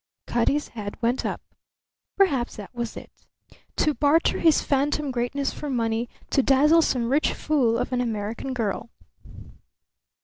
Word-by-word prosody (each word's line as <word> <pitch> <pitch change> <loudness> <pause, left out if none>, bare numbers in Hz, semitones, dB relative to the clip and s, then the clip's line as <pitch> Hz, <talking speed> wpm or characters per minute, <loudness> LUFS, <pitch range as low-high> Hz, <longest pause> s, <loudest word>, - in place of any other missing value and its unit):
Cutty's 260 +5 0
head 205 -3 -7
went 240 +2 0
up. - - -4 0.8
Perhaps 280 -12 +2
that 210 0 -10
was 235 -2 -4
it - - -10 0.6
to 305 - +2
barter 295 +3 +2
his 320 -2 +4
phantom 285 +1 0
greatness 255 +3 -2
for 295 - -6
money, 230 -2 -1 0.2
to 275 - +4
dazzle 290 +5 +5
some 245 -6 0
rich 290 +3 +2
fool 255 -7 +1
of - - -2
an 250 - +1
American 225 +2 -3
girl. 225 -1 -2
255 Hz, 140 wpm, -25 LUFS, 230-290 Hz, 0.8 s, dazzle